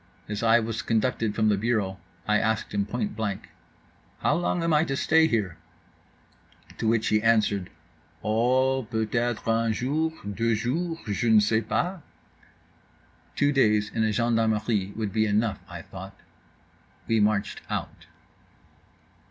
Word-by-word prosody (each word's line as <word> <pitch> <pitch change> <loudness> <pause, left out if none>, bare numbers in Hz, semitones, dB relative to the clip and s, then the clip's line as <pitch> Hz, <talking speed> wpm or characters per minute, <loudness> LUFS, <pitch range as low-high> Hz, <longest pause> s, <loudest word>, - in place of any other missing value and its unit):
As 105 0 -4
I 115 0 +5
was 115 -1 -3
conducted 115 -1 0
from 110 -1 +2
the 105 - +2
bureau 100 -3 -1 0.3
I 105 0 +3
asked 110 -2 -1
him 100 -1 0
point 110 -1 -3
blank: 105 -3 -4 0.7
"How - - +2
long 175 0 0
am 165 -1 +1
I 150 +1 +4
to 135 - -2
stay 160 +2 +4
here?"—to 110 - -7
which 110 -1 +2
he 105 0 +2
answered 105 -4 +2 0.5
"Oh, 130 +3 +2
peut 110 -1 -2
être 120 -1 -1
un 115 0 +2
jour, 150 +8 0
deux 110 +3 0
jours, 160 +10 -2
je 105 +3 -1
ne 110 -1 +7
sais 110 +1 +2
pas." 175 - -2 1.3
Two 145 0 +2
days 105 -6 +2
in 110 - +1
a 110 - +2
gendarmerie 110 -3 +1
would 105 -2 -3
be 110 -1 +2
enough, 105 +1 0
I - - -8
thought. - - -10 0.9
We 115 -1 +2
marched 105 -1 0
out. - - -5
110 Hz, 145 wpm, -26 LUFS, 105-120 Hz, 1.3 s, ne